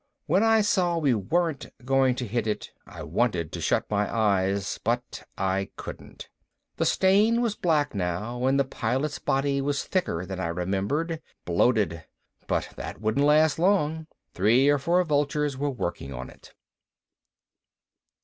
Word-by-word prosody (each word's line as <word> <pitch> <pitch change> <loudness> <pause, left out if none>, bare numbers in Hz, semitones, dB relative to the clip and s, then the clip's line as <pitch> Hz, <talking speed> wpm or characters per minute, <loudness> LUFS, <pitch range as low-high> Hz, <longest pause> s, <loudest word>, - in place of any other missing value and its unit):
When 175 +5 +2
I 225 0 +4
saw 180 -4 +1
we 145 -6 +2
weren't 155 - -1 0.2
going 135 -1 +3
to 125 - -3
hit 115 +2 -1
it, 105 - -3 0.2
I - - -9
wanted 90 -10 -1
to - - -5
shut - - +1
my 105 0 -1
eyes, 100 -3 0
but 120 +2 -2 0.2
I 95 0 -1
couldn't. - - -9 0.5
The - - +1
stain 210 +5 +3
was 235 -3 +1
black 155 -6 +1
now 105 +6 -3
and 135 +1 +3
the 140 - +3
Pilot's 135 +4 -2
body 140 0 0
was 140 0 -1
thicker 90 - -1
than 95 0 -6
I 90 - -1
remembered 100 - -2 0.2
bloated. 90 -2 +1 0.4
But - - -1
that - - -6
wouldn't 110 +7 +1
last 155 0 +4
long. 160 -4 +1 0.3
Three 120 +9 +4
or 145 -1 +3
four 175 +6 +2
vultures 145 -2 0
were 145 +2 -1
working 85 - -4
on 65 -1 -7
it. - - -18
135 Hz, 150 wpm, -26 LUFS, 100-155 Hz, 0.5 s, I